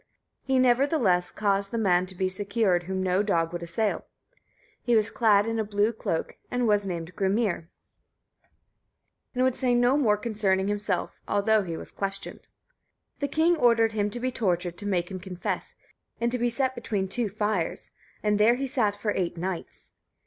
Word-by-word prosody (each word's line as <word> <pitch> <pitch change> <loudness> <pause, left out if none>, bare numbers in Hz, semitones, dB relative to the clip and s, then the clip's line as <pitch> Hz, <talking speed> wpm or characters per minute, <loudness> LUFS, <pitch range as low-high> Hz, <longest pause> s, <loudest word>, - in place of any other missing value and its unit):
He, 265 -1 0
nevertheless, 245 - +3
caused 200 -1 0
the 230 - -3
man 185 -4 +2
to 185 - -9
be 185 +1 0
secured 195 -2 0
whom 190 +1 -2
no 185 +1 +2
dog 170 -5 0
would 175 - -4
assail. 170 +6 -1 0.7
He 240 -2 +2
was 215 0 +2
clad 210 -3 +4
in 225 0 -1
a - - +1
blue 205 +2 +1
cloak, 165 -6 -3
and 245 -1 0
was 205 -2 +2
named 175 -1 -5
Grimnir, 195 -4 0 1.7
and 250 - +2
would 260 -1 +3
say 250 -1 +1
no 245 +3 +4
more 215 -8 +3
concerning 205 -3 0
himself, 205 0 -2
although 215 +1 +3
he 170 -4 -5
was - - -8
questioned. 195 0 -5 0.7
The 285 - 0
king 320 +4 +3
ordered 230 -6 +4
him 210 -1 0
to 240 - -6
be 255 +1 -1
tortured 180 -7 -1
to 205 - -4
make 180 -2 -1
him 185 - -5
confess, 180 0 -4 0.4
and 235 0 0
to 250 - -1
be 240 +1 +2
set 260 +2 0
between 200 -6 -2
two 225 +3 -1
fires; 210 -4 -2 0.3
and 210 -1 +2
there 225 +3 +5
he 270 +2 -2
sat 225 -6 0
for 210 +1 -2
eight 175 -2 -1
nights. 180 0 -5
205 Hz, 180 wpm, -27 LUFS, 185-235 Hz, 1.7 s, there